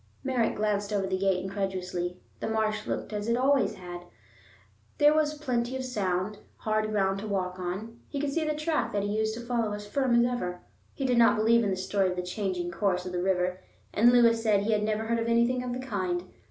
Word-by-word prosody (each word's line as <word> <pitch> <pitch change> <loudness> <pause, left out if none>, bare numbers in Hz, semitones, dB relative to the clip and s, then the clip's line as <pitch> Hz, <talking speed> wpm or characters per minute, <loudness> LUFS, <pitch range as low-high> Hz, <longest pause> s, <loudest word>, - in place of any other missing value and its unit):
Merritt 255 -4 +1
glanced 205 -1 0
over 200 -2 +1
the 190 0 -1
gate 185 -1 +1
incredulously. 185 -2 -3 0.2
The - - -3
marsh 215 -1 0
looked - - -3
as 210 +1 -3
it 235 - +2
had - - -1
always 265 -5 +2
looked; 175 -1 -8 0.9
there 295 +1 +6
was 305 -1 +2
plenty 255 -4 -1
of 260 - -4
sound, 200 -4 -1 0.2
hard 215 0 0
ground 195 -2 +1
to 215 - -5
walk 185 -2 -2
on; 200 +6 -5
he 280 - -3
could 280 -1 -1
see 330 - +1
the 305 -1 -1
track 305 +1 -1
that 205 -1 0
he 205 +1 -1
used 220 0 0
to 235 - -6
follow 235 -3 0
as 205 0 -6
firm 255 +3 +1
as 235 0 +5
ever. 180 -8 -2 0.3
He 275 - -2
did 250 -2 +3
not 230 - +6
believe 230 +2 +4
in 205 - +1
the 190 - 0
story 190 0 +1
of 180 - -3
the 180 - -3
changing 180 -2 -2
course 180 -1 0
of 180 - -4
the 180 -1 -2
river, 185 0 0 0.3
and 235 +3 +6
Lewis 230 -2 +5
said 210 -3 +3
he 215 +2 0
had 210 -1 +2
never 215 +1 0
heard 230 +1 0
of 230 - -1
anything 235 +2 +2
of 250 -1 -4
the 245 - -2
kind. 185 -8 -2
215 Hz, 235 wpm, -28 LUFS, 190-235 Hz, 0.9 s, there